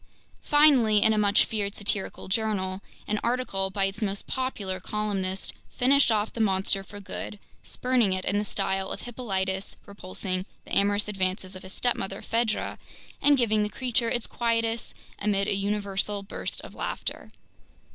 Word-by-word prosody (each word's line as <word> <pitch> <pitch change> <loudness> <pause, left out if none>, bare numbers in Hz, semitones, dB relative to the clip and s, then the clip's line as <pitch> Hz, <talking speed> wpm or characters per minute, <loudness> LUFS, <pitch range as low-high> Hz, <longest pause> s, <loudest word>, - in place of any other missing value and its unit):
Finally, 260 -9 +5
in 220 - +5
a - - 0
much 205 0 +5
feared 205 -2 -2
satirical 200 -1 -1
journal, 190 -2 0 0.3
an 210 0 0
article 230 -6 0
by 195 0 +1
its 195 +3 -3
most 200 -2 -1
popular 210 -8 -3
columnist 195 -2 -1 0.2
finished 270 0 +4
off 215 0 +1
the 230 - -2
monster 195 -1 +2
for 205 +1 -10
good, 200 +1 -5 0.2
spurning 250 -5 +1
it 185 0 -1
in 205 +2 +1
the - - 0
style 190 -1 -1
of - - -4
Hippolytus 195 -6 -2
repulsing 185 -1 -3 0.2
the - - -3
amorous 205 +1 +3
advances 190 -1 -1
of 185 - -8
his 185 +1 -7
stepmother 195 -5 -1
Phaedra, 230 -1 0 0.4
and 290 -1 +5
giving 220 -4 +3
the 210 - 0
creature 240 +1 0
its 240 0 -1
quietus 230 -1 0 0.2
amid 200 -1 +1
a - - +2
universal 200 0 -1
burst 200 - -4
of - - -11
laughter. - - -4
205 Hz, 155 wpm, -27 LUFS, 195-230 Hz, 0.4 s, Finally